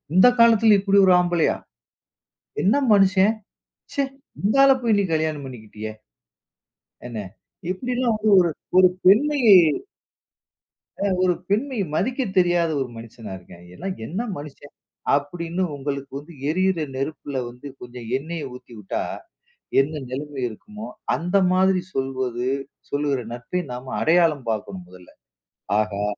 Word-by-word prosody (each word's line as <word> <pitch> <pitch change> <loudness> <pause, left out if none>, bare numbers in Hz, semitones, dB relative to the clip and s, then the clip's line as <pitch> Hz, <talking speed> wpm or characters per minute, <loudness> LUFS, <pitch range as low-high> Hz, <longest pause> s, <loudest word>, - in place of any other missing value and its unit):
இந்த 185 +6 +8
காலத்தில 225 -2 +6
இப்படி 200 0 +2
ஒரு 185 - +6
ஆம்பளையா?" 175 -2 +2 1.1
என்ன 205 +8 +3 0.2
மனுஷன்! 195 0 +5 0.6
ச்ச, - - -11 0.5
இந்த 210 +6 +2
ஆள 275 - +7
போய் 225 -3 +3
நீ 200 - +2
கல்யாணம் 155 -2 -1
பண்ணிக்கிட்டியே. 110 -3 -8 1.2
என்ன, 120 -2 -7 0.5
இப்படியெல்லாம் 245 +3 -1
வந்து 215 0 0
ஒரு 175 -2 +3 0.3
ஒரு 185 -1 +8 0.2
பெண்மையை" 235 +1 +6 1.5
"அ - - +1 0.2
ஒரு 180 -1 +3 0.2
பெண்மையை 220 -1 0
மதிக்கத் 245 - -1
தெரியாத 175 -2 +3
ஒரு 130 - -3
மனுசனா 115 -2 -10
இருக்கான். 90 -1 -15
எல்லாம் 190 - -5
என்ன 180 - -4 0.2
மனுசன்?" 145 0 -11 0.4
அப்படீன்னு 170 +5 -2
உங்களுக்கு 140 0 -5
வந்து 155 +4 -14 0.2
எரியுற 185 +1 +1
நெருப்புல 140 0 -4
வந்து 125 +4 -11
கொஞ்சம் 120 -1 -9
எண்ணெய 160 +3 -6
ஊத்தி 125 - -14
வுட்டா, 100 -2 -3 0.8
என்ன 150 +2 -1
நிலைமை 140 +2 -6
இருக்குமோ? 210 - -10 0.3
அந்த 180 +3 -1 0.2
மாதிரி 185 0 +3
சொல்வது, 130 -2 -2 0.4
சொல்லுகிற 145 -2 0
நட்பை 125 +9 -3
நாம் 125 +1 -7
அடையாளம் 160 -5 +3
பாக்கணும் 100 -4 -4
மொதல்ல. 90 -1 -15 0.7
ஆஹா, 105 -1 -2
160 Hz, 125 wpm, -23 LUFS, 130-195 Hz, 1.5 s, இந்த